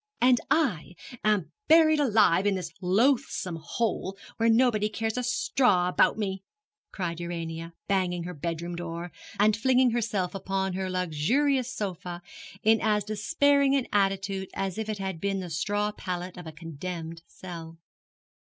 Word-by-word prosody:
'And 250 -1 +5
I 245 - +1 0.3
am 210 -5 +1 0.2
buried 315 -1 +6
alive 210 -8 +4
in 200 - +2
this 175 -3 -4
loathsome 205 -2 +1
hole, 195 +1 -2 0.2
where 230 0 +3
nobody 225 -3 +3
cares 220 +1 -2
a 250 - 0
straw 245 -6 +2
about 180 - +3
me,' 195 -3 -2 0.5
cried 170 -3 -3
Urania, 165 -1 -5
banging 180 -3 0
her 180 +1 -5
bedroom 170 +2 -4
door, 170 0 -5 0.3
and 210 +1 +4
flinging 255 +2 +3
herself 210 -6 -1
upon 195 -1 -2
her 190 0 -2
luxurious 230 - +1
sofa 180 -5 -5 0.4
in 220 +1 +4
as 210 -1 +2
despairing 280 - +2
an 265 -3 +1
attitude 195 -1 0
as 195 +1 -2
if 220 0 -3
it 215 - -2
had 190 -4 -4
been 195 -1 0
the 180 -2 -6
straw 205 +6 0
pallet 180 -3 -5
of 175 -2 -9
a - - -6
condemned 165 +1 -7
cell. 165 -3 -9
195 Hz, 150 wpm, -27 LUFS, 175-225 Hz, 0.5 s, buried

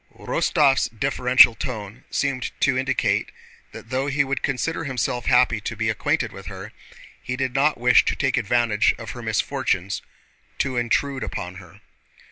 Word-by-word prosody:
Rostóv's 140 -5 +2
deferential 125 +1 +4
tone 110 -1 -7
seemed 135 -3 -1
to - - +3
indicate - - 0 0.4
that 115 - -12
though 130 +2 -1
he 140 0 +2
would 135 0 -3
consider 155 +5 -2
himself 125 -3 -2
happy 125 -3 +3
to 115 - -5
be 110 0 -1
acquainted 125 0 -1
with 95 -1 -11
her, 95 +2 -8 0.5
he 125 - -4
did 130 -1 -2
not 140 +3 +2
wish 125 +1 +5
to - - 0
take 135 -2 0
advantage 115 -2 +2
of - - -7
her - - -8
misfortunes 95 +1 -1 0.6
to 135 -2 -1
intrude 130 +3 0
upon 90 +1 -5
her. - - -17
125 Hz, 155 wpm, -23 LUFS, 110-135 Hz, 0.6 s, wish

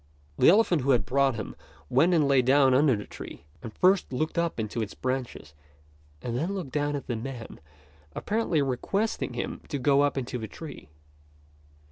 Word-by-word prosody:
The - - +7
elephant 180 -5 +4
who 135 - -2
had 120 -6 +3
brought 135 0 +2
him 110 -3 -6 0.3
went 165 - +3
and 150 -4 +3
lay 135 -2 +4
down 135 +1 +4
under 135 -1 +4
the 105 - -6
tree, - - -10 0.2
and 115 - -7
first 185 - +2
looked 155 +5 -2
up 170 -7 -1
into 110 +1 -3
its 105 - -5
branches 130 - -4 0.7
and 120 -1 -3
then 170 +10 -1
looked 170 -9 -5
down 145 +1 -1
at 140 - -5
the 120 - -3
man, 120 0 -7 0.6
apparently 205 -9 0
requesting 140 - -2
him 120 - -4
to 145 - -2
get 140 +1 +3
up 145 0 +2
into 125 -1 -3
the 110 - -5
tree. 150 - -10
135 Hz, 180 wpm, -27 LUFS, 120-155 Hz, 0.7 s, The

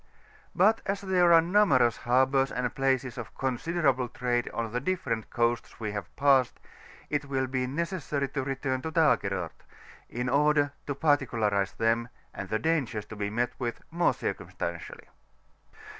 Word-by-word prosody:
But 215 +5 +4
as 195 +1 -1
there 180 -3 +3
are 165 -1 +8
numerous 165 - +3
harbours 130 +2 +2
and 125 -1 -2
places 130 -2 0
of 105 -4 -8
considerable 135 -1 0
trade 120 -1 -1
on 115 -1 -3
the 120 - -1
different 135 - -2
coasts 120 0 -1
we 110 -2 -3
have 100 -4 -6
passed, 135 -3 +3 0.5
it 145 -1 0
will 135 -1 -1
be 130 -1 -2
necessary 150 -1 -2
to 135 0 -2
return 130 -1 -2
to 160 - -4
Dagerort, 100 - +1 0.5
in 125 +1 -3
order 145 +2 +3 0.2
to 140 - -2
particu 140 -4 +1
larize 100 -2 +1
them, 115 +1 +1 0.2
and 95 - -6
the 110 - +1
dangers 120 -6 -1
to 105 - -10
be 100 -1 -2
met 120 +3 -1
with, 120 -2 -3
more 170 +1 +2
circumstantially. - - -5
130 Hz, 155 wpm, -28 LUFS, 120-150 Hz, 0.5 s, are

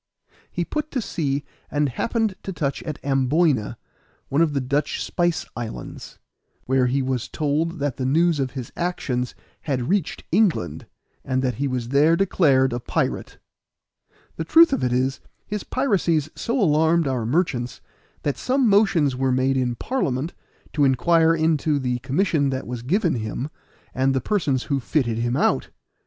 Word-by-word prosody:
He 175 - -2
put 305 - -3
to 270 - -2
sea 145 - -2 0.3
and 145 0 +1
happened 220 - -1
to 195 - -5
touch 145 -6 -2
at 155 -3 -5
Amboyna, 135 -4 +1 0.5
one 140 +4 +2
of 160 -3 +2
the 140 - +1
Dutch 140 +3 -1
spice 175 -1 0
islands, 110 - -7 0.5
where 130 -1 +2
he 135 +2 +1
was 130 -2 -2
told 155 +3 -1
that 140 -3 -2
the 130 - -2
news 165 +2 +3
of 135 -1 0
his 130 -4 -6
actions 130 -8 -2 0.3
had 130 -4 -2
reached 195 -4 0
England, 160 - +1 0.4
and 130 0 -1
that 125 -1 +1
he 140 - +1
was 125 -3 -3
there 150 +5 +4
declared 140 -9 +3
a 120 - -2
pirate. 120 - -2 1.0
The 160 - -2
truth 325 - +6
of - - 0
it 125 - +1
is, 130 +2 0 0.3
his 210 -1 -4
piracies 175 - 0
so 240 +3 -2
alarmed 160 -3 +3
our 130 -3 -1
merchants 125 -2 -1 0.4
that 145 - -1
some 260 0 +2
motions 195 -10 +3
were 130 0 +1
made 130 +1 +2
in 125 -2 0
Parliament, 150 - -2 0.4
to 150 - +2
inquire 165 +5 +4
into 160 -2 +1
the 125 -2 -1
commission 145 +2 +1
that 130 -1 -3
was 120 -1 -5
given 170 - +1
him, 115 +6 -4 0.4
and 135 +1 +1
the - - +2
persons 140 - 0
who 140 -2 -1
fitted 120 -3 0
him 120 +2 0
out. - - +1
140 Hz, 165 wpm, -23 LUFS, 130-170 Hz, 1.0 s, truth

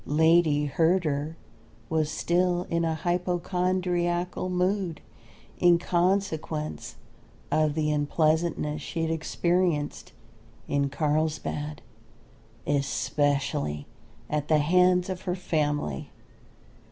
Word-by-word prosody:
Lady 160 -1 +4
Herder 160 -1 +1 0.5
was 155 -1 0
still 175 +1 +1
in 170 0 +1
a 165 -1 0
hypochondriacal 180 +1 -1
mood 180 -2 0 0.6
in 175 -1 +6
consequence 175 -4 -1 0.6
of 155 -1 +2
the 155 -1 +1
unpleasantnesses 155 0 +1
she 165 +3 -3
had 160 - 0
experienced 170 -1 0 0.6
in 140 -1 +1
Carlsbad, 150 0 -2 0.8
especially 140 - 0 0.4
at 150 -1 -2
the 155 - +4
hands 180 +4 +3
of 185 -1 -4
her 180 -2 -2
family. 150 - -1
160 Hz, 90 wpm, -27 LUFS, 150-180 Hz, 0.8 s, in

